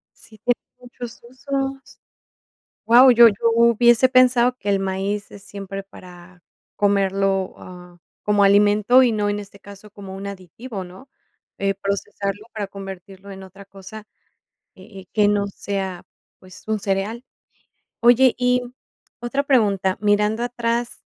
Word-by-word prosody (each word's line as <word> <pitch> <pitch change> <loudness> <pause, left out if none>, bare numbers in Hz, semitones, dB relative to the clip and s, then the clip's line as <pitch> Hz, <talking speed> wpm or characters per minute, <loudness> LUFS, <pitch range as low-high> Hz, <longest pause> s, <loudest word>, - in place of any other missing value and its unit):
Sí, 215 - -18
tiene 245 +3 0 0.2
muchos 245 -1 -10
usos. 270 +1 -5 0.9
Guau, 245 +3 +7
yo 235 0 +8
yo - - -4 0.2
hubiese 235 +2 +4
pensado 250 -1 +4
que 205 - -5
el 200 -1 +2
maíz 195 +2 -3
es 200 -1 -13
siempre 195 -1 -8
para 180 -2 -16 0.3
comerlo, 195 -1 0
ah, 180 -1 -13 0.3
como 205 -1 +2
alimento 205 +5 +4
y 245 - +2
no 210 -1 -1
en 205 0 -2
este 200 0 -12
caso 200 +1 -14
como 195 -2 -10
un 195 +1 -7
aditivo, 200 +3 -8
¿no? 185 +10 -14 0.5
Eh, 195 0 0
procesarlo 200 +1 -4
para 210 -3 -4
convertirlo 195 0 -10
en 190 0 -10
otra 195 +1 -14
cosa, 200 +2 -12 0.7
eh 195 +1 -13
eh, 185 - -16
que 210 -1 +3
no 205 -1 +1
sea, 195 -2 -5 0.4
pues, 185 -1 -15
un 215 -1 -2
cereal. 200 +5 -3 0.8
Oye, 245 +2 +5
y, 250 0 +1
mm, 245 - -11 0.5
otra 275 +4 -1
pregunta, 200 -8 +1
mirando 210 +2 +1
atrás 240 0 -3
205 Hz, 140 wpm, -21 LUFS, 195-235 Hz, 0.9 s, yo